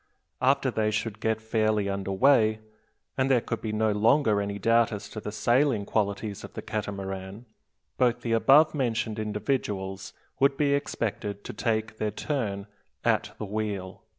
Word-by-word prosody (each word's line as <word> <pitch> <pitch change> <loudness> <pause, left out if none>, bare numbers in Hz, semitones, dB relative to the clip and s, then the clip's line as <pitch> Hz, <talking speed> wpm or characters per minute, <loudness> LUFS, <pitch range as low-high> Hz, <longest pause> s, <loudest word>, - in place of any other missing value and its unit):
After 135 0 +3
they 110 -2 +1
should 110 0 -2
get 110 0 0
fairly 110 -2 +1
under 100 0 -3
way, 110 0 +4 0.6
and 130 +1 +2
there 130 -2 +5
could 115 0 -4
be 110 - -3
no 110 0 +1
longer 110 +1 +3
any 100 0 -3
doubt 115 +2 +3
as 100 -1 -5
to 110 - -6
the 105 - -5
sailing 120 0 +2
qualities 100 -1 -2
of - - -10
the - - -6
Catamaran, 100 0 -5 0.5
both 125 -1 +2
the 115 - -3
above 140 +7 +5
mentioned 115 -5 -1
individuals 105 -3 -3 0.3
would 140 0 +3
be 145 -2 +2
expected 105 -7 -2
to - - -7
take 110 0 -1
their 110 - -1
turn 105 -4 -3 0.4
"at - - +1
the - - -4
wheel." 100 -3 -4
110 Hz, 160 wpm, -27 LUFS, 100-120 Hz, 0.6 s, there